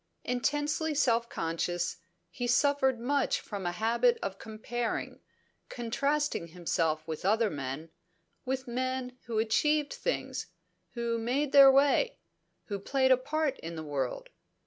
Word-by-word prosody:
Intensely 295 Hz, +5 st, 0 dB
self 235 Hz, -4 st, +2 dB
conscious, 170 Hz, +2 st, -2 dB, 0.3 s
he 245 Hz, -, -3 dB
suffered 265 Hz, 0 st, +3 dB
much 275 Hz, +3 st, +1 dB
from 200 Hz, -4 st, -5 dB
a -, -, 0 dB
habit 235 Hz, +5 st, +2 dB
of 195 Hz, 0 st, -4 dB
comparing, 230 Hz, +2 st, -4 dB, 0.5 s
contrasting 275 Hz, -, -1 dB
himself 160 Hz, -2 st, -1 dB
with 160 Hz, -1 st, -5 dB
other 215 Hz, +2 st, +2 dB
men, 145 Hz, +3 st, -5 dB, 0.5 s
with 260 Hz, 0 st, -3 dB
men 255 Hz, +1 st, -3 dB
who 230 Hz, -2 st, -2 dB
achieved 290 Hz, +7 st, +2 dB
things, -, -, -3 dB, 0.5 s
who 235 Hz, -1 st, -1 dB
made 265 Hz, +5 st, 0 dB
their 275 Hz, -1 st, +9 dB
way, 285 Hz, -, +3 dB, 0.5 s
who 200 Hz, -2 st, -4 dB
played 260 Hz, +5 st, +2 dB
a -, -, +9 dB
part 290 Hz, +2 st, -1 dB
in 165 Hz, +1 st, -6 dB
the 160 Hz, -, -5 dB
world. 140 Hz, -4 st, -3 dB
240 Hz, 130 wpm, -30 LUFS, 195-275 Hz, 0.5 s, their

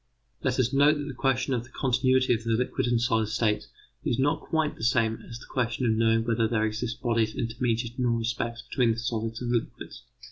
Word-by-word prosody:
Let -, -, 0 dB
us 125 Hz, 0 st, +1 dB
note 145 Hz, +2 st, +5 dB
that 145 Hz, 0 st, -4 dB
the 145 Hz, -, -5 dB
question 130 Hz, 0 st, 0 dB
of 120 Hz, -2 st, -1 dB
the 120 Hz, -, -16 dB
continuity 130 Hz, -1 st, +2 dB
of 115 Hz, -1 st, -2 dB
the 115 Hz, -, -4 dB
liquid 125 Hz, +1 st, 0 dB
and 120 Hz, -1 st, +2 dB
solid 115 Hz, -2 st, +1 dB
states 110 Hz, -1 st, 0 dB, 0.4 s
is 115 Hz, -, 0 dB
not 145 Hz, +4 st, +1 dB
quite 160 Hz, -2 st, -1 dB
the -, -, -10 dB
same 115 Hz, -1 st, +1 dB
as 115 Hz, -, -7 dB
the 120 Hz, -, -13 dB
question 120 Hz, 0 st, -1 dB
of 115 Hz, -, +3 dB
knowing 115 Hz, 0 st, +3 dB
whether 115 Hz, -1 st, +1 dB
there 110 Hz, -1 st, +1 dB
exist 115 Hz, +2 st, -3 dB
bodies 115 Hz, -3 st, +1 dB
intermediate 115 Hz, +1 st, -2 dB
in 125 Hz, -, +2 dB
all 120 Hz, -, +2 dB
respects 115 Hz, +1 st, -3 dB
between 120 Hz, -1 st, +1 dB
the -, -, -8 dB
solids 115 Hz, 0 st, -3 dB
and 120 Hz, -, -2 dB
liquids. 120 Hz, -2 st, -3 dB
120 Hz, 220 wpm, -27 LUFS, 115-125 Hz, 0.4 s, note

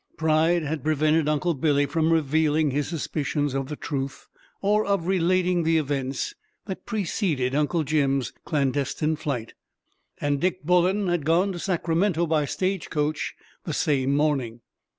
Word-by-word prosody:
Pride 160 Hz, +2 st, +2 dB
had 150 Hz, -2 st, -3 dB
prevented 155 Hz, 0 st, +2 dB
Uncle 155 Hz, +3 st, +1 dB
Billy 145 Hz, 0 st, +2 dB
from 160 Hz, +2 st, +1 dB
revealing 155 Hz, -1 st, +2 dB
his 145 Hz, +1 st, -1 dB
suspicions 145 Hz, -3 st, -2 dB
of 135 Hz, -1 st, -2 dB
the 150 Hz, -, -5 dB
truth, 140 Hz, -2 st, -5 dB, 0.3 s
or 210 Hz, +2 st, +2 dB
of 200 Hz, -5 st, 0 dB
relating 180 Hz, -1 st, +2 dB
the 165 Hz, 0 st, +2 dB
events 140 Hz, -, -2 dB, 0.3 s
that 190 Hz, -3 st, -7 dB
preceded 170 Hz, -, -1 dB
Uncle 150 Hz, +3 st, +1 dB
Jim's 140 Hz, -3 st, 0 dB
clandestine 145 Hz, +1 st, 0 dB
flight, 125 Hz, -7 st, -4 dB, 0.7 s
and 145 Hz, -1 st, 0 dB
Dick 185 Hz, -1 st, 0 dB
Bullen 180 Hz, +4 st, +2 dB
had 175 Hz, -3 st, 0 dB
gone 170 Hz, +6 st, +2 dB
to 175 Hz, -, -6 dB
Sacramento 170 Hz, 0 st, +1 dB
by 155 Hz, -2 st, +1 dB
stage 185 Hz, +4 st, -2 dB
coach 150 Hz, 0 st, -1 dB, 0.3 s
the -, -, -4 dB
same 140 Hz, -2 st, +1 dB
morning. 135 Hz, -6 st, 0 dB
155 Hz, 145 wpm, -25 LUFS, 145-175 Hz, 0.7 s, Pride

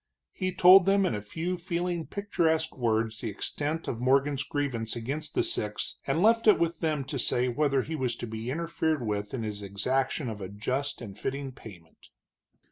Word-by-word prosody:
He 185 Hz, 0 st, -2 dB
told 185 Hz, +1 st, +7 dB
them 195 Hz, 0 st, +4 dB
in -, -, 0 dB
a 105 Hz, -, -3 dB
few 165 Hz, -, -3 dB
feeling, 175 Hz, -1 st, -2 dB
picturesque 165 Hz, -6 st, 0 dB
words 115 Hz, -3 st, 0 dB
the 115 Hz, -, -2 dB
extent 150 Hz, +9 st, -3 dB
of 115 Hz, -, -3 dB
Morgan's 135 Hz, +2 st, +2 dB
grievance 130 Hz, -8 st, -2 dB
against 145 Hz, +6 st, -4 dB
the -, -, +3 dB
six, 105 Hz, 0 st, -2 dB
and 160 Hz, +6 st, +1 dB
left 230 Hz, +1 st, +4 dB
it 215 Hz, -, +8 dB
with 170 Hz, -1 st, 0 dB
them 155 Hz, -3 st, 0 dB
to 135 Hz, +1 st, -4 dB
say 125 Hz, +1 st, +2 dB
whether 140 Hz, +1 st, +1 dB
he 160 Hz, -, -4 dB
was 130 Hz, -5 st, -1 dB
to 120 Hz, -, -5 dB
be 110 Hz, +1 st, -5 dB
interfered 160 Hz, -2 st, -1 dB
with 105 Hz, -1 st, -2 dB
in 115 Hz, -, -3 dB
his 105 Hz, -1 st, -4 dB
exaction 125 Hz, +8 st, -1 dB
of 110 Hz, -3 st, -5 dB
a 95 Hz, -, -5 dB
just 130 Hz, +9 st, -2 dB
and 105 Hz, -3 st, -8 dB
fitting 135 Hz, 0 st, -3 dB
payment. 95 Hz, -10 st, -14 dB
135 Hz, 190 wpm, -28 LUFS, 115-165 Hz, -, it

